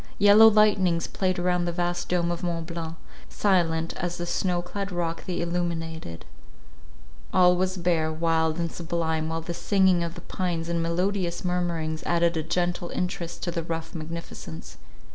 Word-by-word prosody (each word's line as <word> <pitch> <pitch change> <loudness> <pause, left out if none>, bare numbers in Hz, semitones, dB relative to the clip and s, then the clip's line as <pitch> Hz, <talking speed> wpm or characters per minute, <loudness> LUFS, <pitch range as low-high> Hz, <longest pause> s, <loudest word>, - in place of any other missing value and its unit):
Yellow 205 +2 +8
lightnings 200 -6 +4
played 185 -1 -1
around 180 0 +1
the 175 - -1
vast 175 0 -2
dome 175 -1 +1
of 170 - -3
Mont 170 -2 -2
Blanc, 165 -1 -5 0.3
silent 165 -5 +1
as 175 0 -3
the 175 - -3
snow 175 0 0
clad 200 +2 -5
rock 170 -2 -3
they 180 - -2
illuminated; 165 - -3 1.1
all 180 0 +5
was 185 +1 0
bare, 170 -3 +1
wild, 160 0 +1
and 170 -1 -2
sublime, 160 -2 -2
while 165 0 -2
the 170 +1 -5
singing 190 -1 +3
of 170 0 -4
the 175 - -9
pines 170 -2 -3
in 170 -1 0
melodious 175 +1 -1
murmurings 170 -3 -1
added 170 0 +2
a 160 - 0
gentle 175 +2 -1
interest 170 -2 -4
to 175 - -1
the 170 -1 -2
rough 165 0 -5
magnificence. 160 - -7
170 Hz, 160 wpm, -26 LUFS, 165-180 Hz, 1.1 s, Yellow